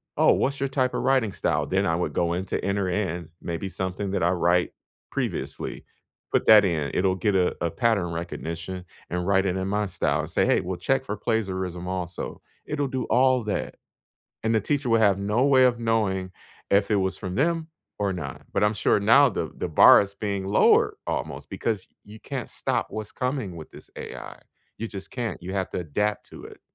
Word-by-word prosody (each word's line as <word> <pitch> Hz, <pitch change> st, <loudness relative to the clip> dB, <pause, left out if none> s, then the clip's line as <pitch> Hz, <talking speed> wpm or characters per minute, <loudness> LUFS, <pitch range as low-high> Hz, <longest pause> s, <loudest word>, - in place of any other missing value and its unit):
"Oh, -, -, +5 dB
what's 140 Hz, +1 st, 0 dB
your 140 Hz, 0 st, -1 dB
type 130 Hz, -2 st, 0 dB
of -, -, -1 dB
writing 130 Hz, -6 st, +2 dB
style?" 75 Hz, -5 st, 0 dB
Then 95 Hz, +5 st, +1 dB
I 80 Hz, -, +2 dB
would 90 Hz, -, -2 dB
go 85 Hz, -1 st, +1 dB
in 90 Hz, +2 st, -2 dB
to -, -, -3 dB
enter 100 Hz, -1 st, 0 dB
in 90 Hz, -3 st, -2 dB
maybe 85 Hz, +3 st, -4 dB
something 95 Hz, +1 st, -3 dB
that 100 Hz, -, -1 dB
I 85 Hz, -, +4 dB
write 90 Hz, 0 st, +2 dB, 0.4 s
previously, -, -, -4 dB, 0.5 s
put -, -, +1 dB
that 105 Hz, -2 st, +8 dB
in, 80 Hz, -6 st, 0 dB
it'll 95 Hz, 0 st, +2 dB
get 100 Hz, +1 st, 0 dB
a 90 Hz, -1 st, +2 dB
a 85 Hz, -, +1 dB
pattern 105 Hz, -8 st, +1 dB
recognition 85 Hz, +2 st, -5 dB, 0.3 s
and 90 Hz, +1 st, -2 dB
write 95 Hz, 0 st, +3 dB
it 95 Hz, -1 st, 0 dB
in 95 Hz, 0 st, -2 dB
my 105 Hz, +1 st, 0 dB
style 95 Hz, -, 0 dB
and -, -, -6 dB
say, -, -, +2 dB
"Hey, -, -, +3 dB
we'll 90 Hz, 0 st, -4 dB
check 135 Hz, +4 st, 0 dB
for 100 Hz, -, -3 dB
plagiarism 95 Hz, -5 st, -2 dB
also." 90 Hz, -1 st, -4 dB, 0.2 s
It'll 145 Hz, -2 st, -1 dB
do 130 Hz, -1 st, -2 dB
all 130 Hz, 0 st, +3 dB
that, 105 Hz, -, -3 dB, 0.7 s
and 110 Hz, 0 st, +1 dB
the 110 Hz, -, +4 dB
teacher 145 Hz, +1 st, -1 dB
will 115 Hz, -1 st, +4 dB
have 100 Hz, -3 st, +4 dB
no 105 Hz, +6 st, +1 dB
way 135 Hz, -2 st, +5 dB
of 125 Hz, -2 st, +3 dB
knowing 105 Hz, -5 st, 0 dB, 0.4 s
if 100 Hz, 0 st, +3 dB
it 105 Hz, -, +4 dB
was 95 Hz, -1 st, 0 dB
from 95 Hz, -2 st, -5 dB
them 165 Hz, +3 st, 0 dB, 0.3 s
or 100 Hz, -2 st, 0 dB
not, 90 Hz, -, -7 dB
but -, -, +1 dB
I'm 105 Hz, -, +2 dB
sure 105 Hz, -, +2 dB
now 130 Hz, +7 st, +6 dB
the 110 Hz, -, -3 dB
the -, -, -3 dB
bar -, -, +8 dB
is 100 Hz, 0 st, -5 dB
being 100 Hz, -2 st, -3 dB
lowered 100 Hz, -, +4 dB
almost -, -, -4 dB
because 110 Hz, -5 st, -2 dB, 0.2 s
you 105 Hz, +2 st, -13 dB
can't -, -, -5 dB
stop -, -, -1 dB
what's 110 Hz, 0 st, -5 dB
coming 125 Hz, -8 st, -2 dB
with 80 Hz, -2 st, -10 dB
this -, -, -13 dB
AI. -, -, -8 dB, 0.4 s
You 115 Hz, -, -4 dB
just 100 Hz, -1 st, -7 dB
can't. 120 Hz, -6 st, -4 dB
You 90 Hz, +2 st, -6 dB
have 95 Hz, -1 st, -1 dB
to -, -, -2 dB
adapt 105 Hz, +6 st, -1 dB
to -, -, -11 dB
it. -, -, -12 dB
100 Hz, 210 wpm, -25 LUFS, 90-115 Hz, 0.7 s, that